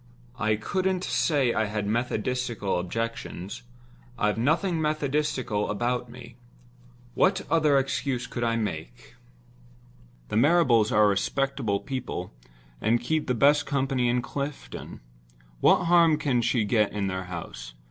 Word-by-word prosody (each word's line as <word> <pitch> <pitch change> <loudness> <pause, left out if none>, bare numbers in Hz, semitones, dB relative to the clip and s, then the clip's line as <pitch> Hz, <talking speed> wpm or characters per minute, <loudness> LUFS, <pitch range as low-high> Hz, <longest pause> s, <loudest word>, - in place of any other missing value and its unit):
I 110 -1 +2
couldn't 185 - -1
say 140 -11 +1
I 110 - +1
had 105 0 -3
methodistical 115 -2 -1
objections—I've 115 +3 -5
nothing 160 - +1
methodistical 145 -7 -1
about 120 +3 -1
me. 120 0 -12 0.8
What 190 +5 +2
other 155 -4 +4
excuse 135 -1 -1
could 120 - -4
I 115 -1 +1
make? 110 +3 -5 1.2
The - - -1
Marrables 125 -6 +4
are 105 0 +5
respectable 110 +1 0
people, 125 - -5 0.5
and 115 +2 +2
keep 155 +6 -1
the 125 - +1
best 145 +4 +4
company 135 -3 0
in 125 0 +1
Clifton. 140 +3 -6 0.6
What - - +4
harm 170 -2 +5
can 140 -6 +1
she 120 -1 +1
get 105 -1 +2
in 105 -1 -1
their 95 -1 -3
house? - - -8
120 Hz, 125 wpm, -26 LUFS, 110-140 Hz, 1.2 s, are